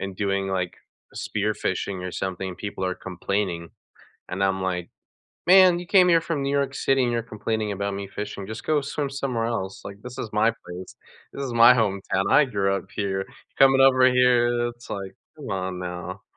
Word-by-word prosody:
and 95 -1 -5
doing 100 -1 -1
like, 90 -2 -2 0.4
spearfishing 100 -3 -2
or - - -4
something, 95 0 -4
people 100 0 -5
are 90 0 -1
complaining. 90 -2 -3 0.6
And 95 +2 -3
I'm 95 0 0
like, 90 -2 -2 0.6
"Man, 185 -1 +7
you 175 - -7
came 185 -2 +6
here 165 -1 +5
from 165 -3 -2
New 140 - -1
York 140 -1 0
City 135 -1 +2
and 120 - +1
you're 120 0 0
complaining 110 -1 -3
about 100 0 -2
me 100 0 -5
fishing, 100 0 -6
just 110 +1 -7
go 150 -2 +2
swim 140 0 -3
somewhere 130 -4 -2
else, 95 -5 -3
like, 100 +1 -9
this 125 +2 -9
is 115 - -4
my 110 +2 +3
place, 90 +1 -9 0.4
this 140 - -5
is 125 - -4
my 115 0 +8
hometown, 100 -4 0
I 150 - +6
grew 100 -5 0
up 95 - -5
here, 95 -1 -1 0.3
coming 135 0 +6
over 130 -1 +6
here, 120 -1 +3
it's 120 0 -14
like, 100 -1 -5 0.2
come 145 -7 -9
on 95 -1 -3
now." 90 +2 -6
105 Hz, 190 wpm, -24 LUFS, 95-125 Hz, 0.6 s, my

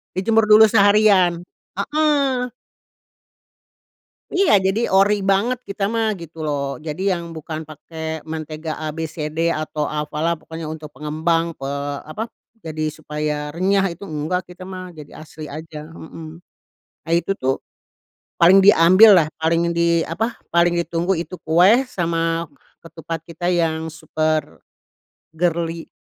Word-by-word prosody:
Dijemur 220 +4 +2
dulu 215 +1 +9
seharian. 200 -4 +4 0.4
Heeh. 275 0 +1 1.8
Iya. 375 - +3
Jadi 195 +5 +1
ori 200 +2 +3
banget 200 +6 +1
kita 200 +1 -2
mah 225 -2 0
gitu 165 -2 -11
loh. 140 -1 -2
Jadi 165 +6 -2
yang 170 -2 -4
bukan 155 0 -6
pakai 160 0 -7
mentega 155 0 -6
A, 155 - -4
B, 165 - -3
C, 150 -2 -4
D, 165 +2 0
atau 155 -1 -3
apalah 150 +2 -2
pokoknya 160 0 -8
untuk 155 -1 -8
pengembang 160 +3 -1
pe 135 - -5 0.4
apa, 220 +9 -5 0.3
jadi 155 -1 -4
supaya 150 -1 -4
renyah 190 +3 +1
itu 170 - -10
enggak 160 +4 -3
kita 180 +1 -11
mah. 185 -2 -8
Jadi 150 -2 -11
asli 155 0 -10
aja. 155 0 -8
Hmm. 160 0 -10 0.7
Nah, 165 - -3
itu 170 +3 0
tuh 130 +1 -1 0.8
paling 180 +3 +7
diambillah 185 -1 +7
paling 165 +1 +1
di, 170 0 +3
apa, 220 +8 -2 0.2
paling 170 0 +3
ditunggu 170 +2 0
itu 180 +2 -6
kue 185 +11 +5
sama 165 -4 -1 0.3
ketupat 165 0 -7
kita 170 +1 -6
yang 160 -2 0
super 155 - -2 0.7
girly. 165 0 -1
165 Hz, 130 wpm, -21 LUFS, 155-190 Hz, 1.8 s, dulu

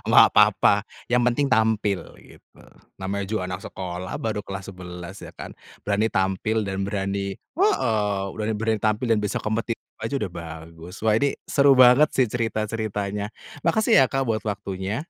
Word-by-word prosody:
Enggak - - +7
papa, - - +5 0.3
yang 125 - +4
penting 125 +4 +2
tampil, 110 -5 +2 0.2
gitu, - - -19 0.4
namanya 100 +1 -3
juga 110 -4 -1
anak 90 +1 -5
sekolah 90 -1 -5
baru 110 -2 -2
kelas 95 0 -7
11 90 +1 -9
ya - - -8
kan, - - -9 0.3
berani 105 +2 +1
tampil 95 +3 0
dan 95 0 -2
berani 100 0 -2
heeh, 110 - 0
berani 110 0 -2
berani 110 -1 0
tampil 110 +3 +1
dan 110 -2 +2
bisa 105 - -1
kompetitif 115 +2 -2 0.2
aja 135 +5 -1
udah 100 -7 -4
bagus. 80 +2 -9
Wah, 110 -1 +4
ini 140 +5 +1
seru 140 -2 +4
banget 130 +4 +7
sih 130 -2 +4
cerita-ceritanya. 105 -3 -2 0.3
Makasih 220 - +4
ya, 130 - +1
Kak, 135 -1 0
buat 110 -2 -1
waktunya. 100 +3 -3
105 Hz, 160 wpm, -24 LUFS, 95-115 Hz, 0.4 s, Enggak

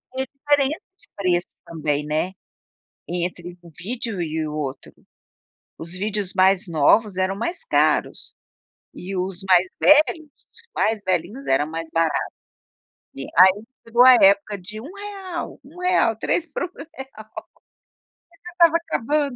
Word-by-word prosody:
vê 265 0 -2
diferença 290 +2 +1 0.2
de - - -29
preço, 180 -3 0 0.2
também, 150 -3 -2
né, 155 +5 -1 0.7
entre 175 0 -4
um 170 - -13
vídeo 225 -2 -4
e 160 -1 -2
o 150 - -6
outro. 140 -3 -5 0.8
Os 165 +1 -5
vídeos 200 0 -2
mais 190 0 +3
novos 180 +6 +3
eram 190 +1 0
mais 340 - -3
caros - - 0 0.6
e 195 +2 -7
os 185 0 -3
mais 185 0 +5
velhos, 305 +1 +4
os 460 - -22
mais 220 0 0
velhinhos, 185 +8 -2
era 135 +2 +2
mais 160 +1 -6
barato. 165 -1 +1 0.9
E 135 - -6
aí 190 +4 +6 0.2
chegou 235 +2 +4
a 255 - +10
época 200 -1 +4
de 210 +4 -9
1 295 +8 -10
real, 395 -4 -7
1 310 +6 -15
real, 360 -11 +2
3 335 +8 -1
por - - -3
um - - -2
real. 360 - -12
Chega 265 - -6 1.5
estava 335 -2 +5
acabando 290 -3 -1
200 Hz, 145 wpm, -22 LUFS, 175-275 Hz, 1.5 s, a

